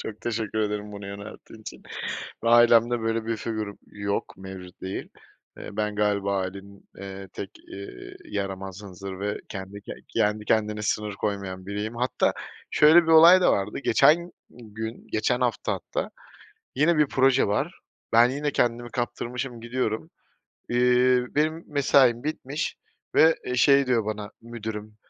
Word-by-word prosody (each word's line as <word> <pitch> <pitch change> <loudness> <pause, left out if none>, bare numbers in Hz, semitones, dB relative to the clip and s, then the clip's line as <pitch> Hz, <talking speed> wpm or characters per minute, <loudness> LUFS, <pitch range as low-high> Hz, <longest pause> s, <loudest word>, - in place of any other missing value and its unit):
Çok 110 -1 -7
teşekkür 110 -2 -2
ederim 105 -1 -2
bunu 100 -1 -8
yönelttiğin 100 +2 -10
için 110 - -10 0.6
ve 115 - +2
ailemde 120 0 +5
böyle 115 0 -1
bir 115 -1 -1
figürüm 110 -2 -4
yok, 100 0 -3
mevcut 95 -1 -10
değil. 95 +1 -5 0.5
Eee, - - -8
ben 105 -1 -1
galiba 100 -2 +1
ailenin, 100 +1 -6
eee, 95 0 -8
tek, - - -7 0.2
ııı, 100 -11 -9
yaramaz, 95 -1 -5
hınzır 95 -1 -8
ve 105 +1 -2
kendi 100 0 -7
ke - - -9 0.2
kendi 105 0 0
kendine 105 -1 +1
sınır 105 0 -1
koymayan 100 -2 -4
biriyim. 105 +3 -4
Hatta 125 +2 +1 0.4
şöyle 160 +3 +7
bir - - -8
olay 165 +3 +8
da - - +5
vardı, 100 +1 -1
geçen 170 +5 +4 0.2
gün, 110 -1 -8
geçen 120 +3 0
hafta 120 -4 0
hatta - - -4 0.7
yine 155 +5 +3
bir 150 -1 +4
proje 135 0 +3
var. 100 - -1 0.3
Ben 120 +2 +7
yine 145 +3 -2
kendimi 120 -1 0
kaptırmışım, 125 0 -4
gidiyorum. 115 +3 -2 0.6
Eee, 125 +1 +4
benim 155 +3 +1
mesaim 130 -4 +4
bitmiş 150 -1 -3 0.4
ve, 160 +1 +6
eee, 125 - -2
şey 140 +2 +5
diyor 115 -4 +2
bana 105 -1 -4
müdürüm, 110 -2 -7
110 Hz, 145 wpm, -26 LUFS, 100-125 Hz, 0.7 s, olay